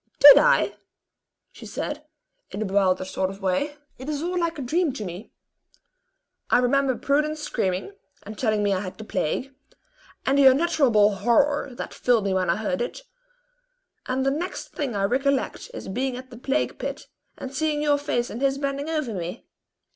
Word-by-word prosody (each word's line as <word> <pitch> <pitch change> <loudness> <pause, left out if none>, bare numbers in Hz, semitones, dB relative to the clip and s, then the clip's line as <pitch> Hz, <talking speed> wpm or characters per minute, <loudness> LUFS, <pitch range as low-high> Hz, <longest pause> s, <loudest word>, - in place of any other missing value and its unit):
"Did 285 0 +10
I?" - - +3 0.7
she - - -11
said, - - -4 0.5
in - - -6
a 215 - -1
bewildered 190 -1 +2
sort 190 0 -2
of 195 0 -9
way. 285 +11 0 0.2
"It 260 +3 -6
is 300 0 -2
all 355 +1 -2
like 335 -1 -1
a 280 - -4
dream 315 +3 +1
to 220 -6 -5
me. 180 +4 -8 1.2
I - - +5
remember 260 +1 +2
Prudence 300 +2 0
screaming, 195 - -2 0.3
and 215 +2 -8
telling 215 -2 0
me 200 -1 +2
I 185 - 0
had 185 -1 -6
the 220 - -8
plague, 250 - -2 0.7
and 275 +1 +3
the 275 - +8
unutterable 260 -8 +4
horror 260 +5 +2
that - - -6
filled 235 -4 +2
me 195 - +1
when 185 -2 0
I 170 - +3
heard 230 +5 -2
it; 245 - -4 1.0
and 260 +1 -1
then 270 - +2
the 295 - -2
next 360 +2 -5
thing 270 -7 -4
I 200 - 0
recollect 270 - 0
is, - - -8
being 250 +5 -2
at 255 0 -10
the 240 - -10
plague 270 +3 -1
pit, - - -5 0.3
and 265 - -7
seeing 300 +1 0
your 290 -1 +3
face 245 -4 -1
and 235 - -6
his 275 0 +2
bending 280 +1 -3
over 305 -8 -2
me. 180 +3 -5
260 Hz, 185 wpm, -24 LUFS, 205-285 Hz, 1.2 s, Did